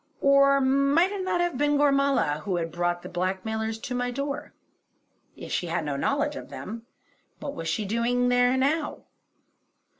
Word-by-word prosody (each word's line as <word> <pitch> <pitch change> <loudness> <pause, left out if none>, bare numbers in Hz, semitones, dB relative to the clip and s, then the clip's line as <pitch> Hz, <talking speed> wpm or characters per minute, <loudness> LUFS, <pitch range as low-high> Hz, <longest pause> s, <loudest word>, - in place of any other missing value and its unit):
Or 275 0 +5
might 275 +7 +3
it 400 -2 -3
not 360 -1 0
have 350 -7 -1
been 290 0 +2
Gormala 275 - +2
who 185 +3 -2
had 165 -1 -2
brought 175 +1 -1
the - - -7
blackmailers 220 +5 -2
to 255 - -4
my 245 0 -1
door. 275 +3 -4 0.9
If - - -9
she 175 - -1
had 165 -1 -2
no 145 -1 -2
knowledge 285 - 0
of - - -8
them, 230 +3 -8 0.5
what 280 - -5
was 165 - -6
she 215 - -1
doing 240 +4 +1
here 245 +1 +3
now? 295 +4 0
245 Hz, 170 wpm, -26 LUFS, 190-280 Hz, 0.9 s, Or